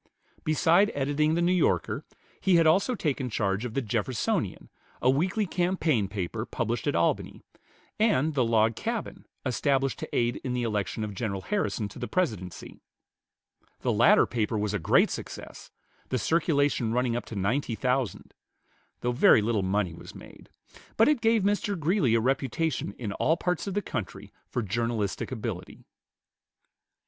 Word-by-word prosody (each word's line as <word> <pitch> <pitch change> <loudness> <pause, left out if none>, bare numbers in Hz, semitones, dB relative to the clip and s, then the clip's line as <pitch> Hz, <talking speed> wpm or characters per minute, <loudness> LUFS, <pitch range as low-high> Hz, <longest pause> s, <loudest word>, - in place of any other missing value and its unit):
Beside 165 +5 +3
editing 145 +3 +1
the 170 - +1
"New 175 - +3
Yorker," 180 -2 +1 0.4
he 190 -2 +3
had 165 -1 +5
also 195 +10 +3
taken 140 - -2
charge 100 0 -1
of 115 - -6
the 135 - 0
"Jeffersonian," 115 +2 -2 0.3
a 130 - +4
weekly 185 +9 +1
campaign 175 - +1
paper 100 +2 -4
published 120 +1 -3
at 145 - +1
Albany, 85 - 0 0.6
and 160 - +2
the 135 -3 +2
"Log 115 -1 +2
Cabin," 230 - -4 0.2
established 135 +1 0
to - - -6
aid 120 0 +1
in 125 - -2
the 125 - -1
election 110 -1 -2
of 105 -1 -4
General 100 -2 -3
Harrison 200 - -1
to 100 - -11
the 120 - -3
Presidency. 105 - -3 1.0
The - - +1
latter - - +5
paper 110 -2 -1
was 105 0 -1
a 105 - 0
great 80 - +3
success, - - -8 0.4
the 130 - 0
circulation 145 - +1
running 125 -1 +1
up 120 - -3
to 115 - -8
ninety 115 +5 0
thousand, 125 -1 -2 0.7
though 120 - 0
very 120 -3 +5
little 110 -2 +1
money 95 -2 0
was 85 - -11
made; - - -13 0.5
but 225 - +5
it 295 -6 +2
gave 225 -2 +3
Mr. 205 -1 0
Greeley 155 - +2
a - - +4
reputation 135 0 -1
in 105 -3 -5
all 160 +10 +1
parts 180 +2 -2
of 195 - -3
the 205 - 0
country 95 -7 -6 0.2
for 125 - -2
journalistic 110 0 -2
ability. - - -6
125 Hz, 160 wpm, -27 LUFS, 110-165 Hz, 1.0 s, had